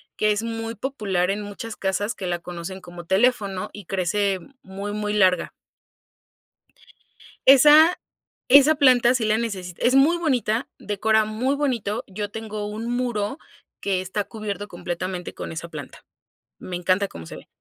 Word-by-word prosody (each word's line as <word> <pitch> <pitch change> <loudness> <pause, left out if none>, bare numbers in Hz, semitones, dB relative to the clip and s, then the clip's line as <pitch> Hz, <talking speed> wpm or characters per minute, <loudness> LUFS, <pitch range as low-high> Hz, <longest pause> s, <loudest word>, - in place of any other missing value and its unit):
que 215 0 +2
es 210 +2 -1
muy 225 0 -4
popular 205 -7 -1
en 200 +2 -1
muchas 210 +2 -7
casas 195 +3 -1
que 190 - -5
la 175 -1 -1
conocen 175 +2 -7
como 175 -2 -11
teléfono 195 -1 +1
y 205 -2 -10
crece 195 +2 0 0.2
muy, 195 +2 -6
muy 210 0 -2
larga. 185 -3 +3 2.0
Esa 300 +6 +8 0.5
esa 285 +4 +7
planta 255 -3 +5
sí 245 - 0
la 215 0 +2
necesita 190 -6 -5
es 250 +2 +4
muy 295 +6 +5
bonita 250 - 0
decora 220 +1 +1
muy 235 +6 -1
bonito 235 -7 -1
yo 205 +1 -5
tengo 215 -1 -5
un 215 +3 -5
muro 240 +1 -2 0.4
que 190 -2 0
está 190 +2 -3
cubierto 205 -1 -5
completamente 175 0 -5
con - - -7
esa 165 +1 -6
planta. 150 -4 -10 0.5
Me 180 - -6
encanta 185 +3 +1
como 80 - -10
se - - -9
ve. - - -13
210 Hz, 155 wpm, -23 LUFS, 190-235 Hz, 2.0 s, Esa